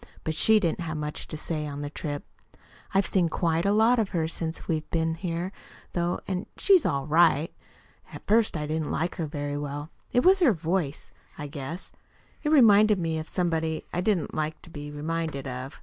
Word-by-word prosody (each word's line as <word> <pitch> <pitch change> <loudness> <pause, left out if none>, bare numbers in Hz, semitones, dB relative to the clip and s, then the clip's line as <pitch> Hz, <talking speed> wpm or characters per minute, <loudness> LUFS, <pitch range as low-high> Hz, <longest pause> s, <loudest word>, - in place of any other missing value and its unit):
But 160 - -1
she 215 +7 +5
didn't 170 -4 0
have 165 -2 -3
much 150 0 -4
to 155 - -6
say 150 -1 -3
on 145 0 -5
the 145 - -4
trip. 145 -2 -4 0.7
I've 195 +1 +3
seen 180 -4 +2
quite 165 +2 0
a - - +4
lot 225 +4 +4
of 215 -3 +1
her 165 -4 0
since 165 0 -4
we've 155 -2 -2
been 165 -1 0
here, 170 +1 -3 0.4
though, 175 0 0
and 185 -1 -3
she's 380 -6 +5
ALL 140 -1 -1
RIGHT. 155 0 +4 0.6
At - - -10
first 220 -4 +3
I 150 - -3
didn't 155 0 -2
like 170 +2 -2
her 165 - -2
very 145 -1 -3
well. 145 +2 -5 0.2
It 245 - +4
was 380 +1 +6
her 300 - +5
voice, 165 -3 -2 0.3
I 150 - -5
guess. 145 +4 -6 0.5
It 300 - -1
reminded 215 -7 +6
me 165 -2 -1
of 155 - -6
somebody 160 -3 -1
I 175 - 0
didn't 190 -4 0
like 155 0 -2
to 170 - -12
be 145 -1 -7
reminded 150 -1 -3
of. 130 +1 -6
165 Hz, 195 wpm, -27 LUFS, 150-185 Hz, 0.7 s, was